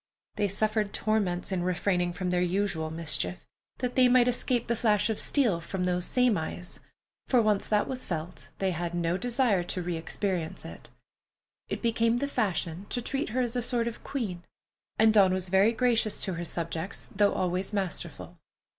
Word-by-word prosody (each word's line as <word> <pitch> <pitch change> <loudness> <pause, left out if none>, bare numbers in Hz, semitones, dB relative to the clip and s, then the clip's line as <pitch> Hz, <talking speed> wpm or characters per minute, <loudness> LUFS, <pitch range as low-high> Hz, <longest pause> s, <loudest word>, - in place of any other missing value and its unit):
They 205 -1 +1
suffered 215 +1 0
torments 200 -5 0
in 185 -2 0
refraining 180 0 0
from 180 0 -2
their 180 0 +2
usual 180 -3 0
mischief, 155 - -2 0.3
that 250 -1 -2
they 255 -1 +5
might 250 0 +5
escape 245 -1 +1
the 235 - 0
flash 210 -1 +2
of 215 - -3
steel 230 - +2
from 180 +2 -3
those 180 0 +1
same 250 -7 +3
eyes, 175 +2 -6 0.5
for 255 - +4
once 215 -3 +2
that 210 -1 +2
was 255 -1 -1
felt, 165 0 -5
they 190 -1 0
had 175 0 -3
no 170 0 0
desire 240 -2 +1
to 180 +1 -3
re 175 0 -2
experience 170 0 -3
it. - - -10 0.8
It - - -4
became 230 0 +2
the 280 +3 -1
fashion 195 - -2
to 245 - 0
treat 270 +3 -2
her 250 +4 0
as 240 -1 -2
a 245 - +1
sort 235 -1 -1
of 235 - -6
queen, 205 -11 -3 0.6
and 220 0 +5
Dawn 190 -3 +5
was 185 -1 -3
very 195 +4 +5
gracious 230 -3 +1
to 190 - +1
her 170 0 -4
subjects, 165 +2 -4
though 205 0 +4
always 185 +2 -1
masterful. 195 -5 -4
200 Hz, 180 wpm, -28 LUFS, 175-230 Hz, 0.8 s, they